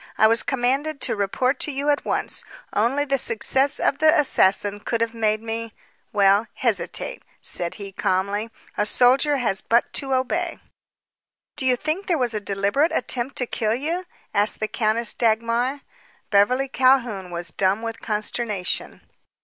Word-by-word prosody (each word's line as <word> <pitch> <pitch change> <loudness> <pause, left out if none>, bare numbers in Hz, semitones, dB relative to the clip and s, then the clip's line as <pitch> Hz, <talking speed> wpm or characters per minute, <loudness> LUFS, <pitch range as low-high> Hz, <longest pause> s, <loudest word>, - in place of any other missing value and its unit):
I - - +5
was 230 +1 +4
commanded 275 +3 -1
to - - 0
report 250 +7 0
to 300 - 0
you 280 +2 -1
at 285 - -1
once. - - -2 0.3
Only 255 +7 +1
the 275 -1 +1
success 265 +5 +2
of 280 - +1
the 315 +1 +5
assassin 205 -6 +2
could 230 +2 -2
have 230 0 -1
made 215 -1 0
me 225 0 -5 0.4
well, 200 +2 +3
hesitate," - - -2 0.2
said 170 -1 -2
he 200 -1 -8
calmly. 200 +4 -1 0.3
"A 210 - +3
soldier 265 +6 +3
has 215 -7 +1
but 235 +1 +1
to 270 -2 -1
obey." 335 +7 -1 1.0
"Do 265 -3 0
you 255 - +5
think 310 +9 -3
there 345 - +2
was 245 -4 0
a 215 - -1
deliberate 200 - +1
attempt 250 +1 -2
to 250 - +1
kill 220 -2 -1
you?" 330 +8 -3 0.3
asked 205 0 +2
the 215 - -1
Countess 220 +1 0
Dagmar. 235 +4 0 0.5
Beverly 250 +7 +3
Calhoun 250 -8 +2
was 170 -1 -3
dumb 195 +5 +1
with 225 -1 -5
consternation. 210 -2 -3
235 Hz, 155 wpm, -23 LUFS, 210-270 Hz, 1.0 s, I